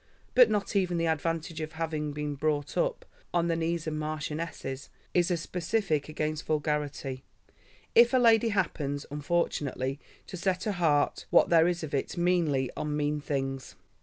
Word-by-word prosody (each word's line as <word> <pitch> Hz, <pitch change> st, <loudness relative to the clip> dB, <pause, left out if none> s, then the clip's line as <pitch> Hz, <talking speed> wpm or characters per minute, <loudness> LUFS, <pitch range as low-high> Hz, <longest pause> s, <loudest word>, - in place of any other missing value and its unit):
But 250 Hz, -2 st, +7 dB
not 210 Hz, -1 st, -1 dB
even 180 Hz, -3 st, +2 dB
the 165 Hz, -, +1 dB
advantage 165 Hz, 0 st, -1 dB
of 155 Hz, +1 st, -5 dB
having 155 Hz, -2 st, -2 dB
been 150 Hz, 0 st, -3 dB
brought 145 Hz, 0 st, -1 dB
up -, -, 0 dB, 0.3 s
"on 170 Hz, 0 st, +2 dB
the 165 Hz, -, +2 dB
knees 165 Hz, 0 st, -1 dB
of 160 Hz, -, -2 dB
marchionesses" 155 Hz, -2 st, -4 dB, 0.2 s
is 175 Hz, 0 st, +3 dB
a 175 Hz, -, +1 dB
specific 165 Hz, -2 st, -1 dB
against 155 Hz, 0 st, -3 dB
vulgarity, 150 Hz, -3 st, -2 dB, 0.7 s
if 235 Hz, 0 st, +7 dB
a 260 Hz, -, +4 dB
lady 230 Hz, -2 st, +5 dB
happens, 145 Hz, -8 st, -1 dB
unfortunately, 145 Hz, -3 st, -1 dB, 0.3 s
to 185 Hz, -, -7 dB
set 185 Hz, +1 st, 0 dB
her 215 Hz, -, 0 dB
heart, 165 Hz, -6 st, +1 dB
what -, -, +5 dB
there 165 Hz, -1 st, +6 dB
is 175 Hz, -1 st, -1 dB
of 150 Hz, -, -6 dB
it, 140 Hz, -, -2 dB
meanly 165 Hz, -7 st, +1 dB
on 150 Hz, -1 st, -2 dB
mean 150 Hz, 0 st, 0 dB
things. 135 Hz, -2 st, -3 dB
155 Hz, 165 wpm, -29 LUFS, 145-175 Hz, 0.7 s, But